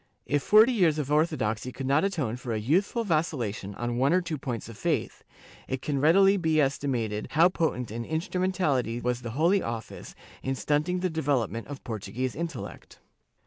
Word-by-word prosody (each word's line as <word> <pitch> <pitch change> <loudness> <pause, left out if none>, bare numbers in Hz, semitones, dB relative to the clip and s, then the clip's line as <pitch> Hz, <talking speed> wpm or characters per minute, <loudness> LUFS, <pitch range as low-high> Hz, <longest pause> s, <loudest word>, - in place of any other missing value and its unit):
* - - -47
If 145 - +2
forty 215 - +6
years 175 -9 +3
of 145 -2 -3
orthodoxy 140 -7 0
could 135 - -6
not 140 +4 +3
atone 155 - -1
for 125 -1 -5
a 110 - -1
youth 155 - +2
ful 235 +2 -3
vacillation 125 - -1
on 120 0 -3
one 135 +6 +3
or 185 - +4
two 165 -4 -4
points 120 -5 -4
of 115 - -10
faith, - - -2 0.4
it 130 -1 -4
can 140 -2 -1
readily 195 +6 +5
be 160 -3 +1
estimated 130 -7 -1
how 165 +3 +6
potent 140 - -1
an 115 +1 -4
instrumentality 160 - -1
was 125 0 -1
the 120 +1 -6
Holy 180 +5 +3
Office 115 -1 -6 0.3
in 135 0 -2
stunting 150 +7 0
the 185 - +1
development 130 -8 -1
of 140 -1 -8
Portuguese 120 +3 -4
intellect. 170 +1 -6
145 Hz, 185 wpm, -27 LUFS, 120-170 Hz, 0.4 s, forty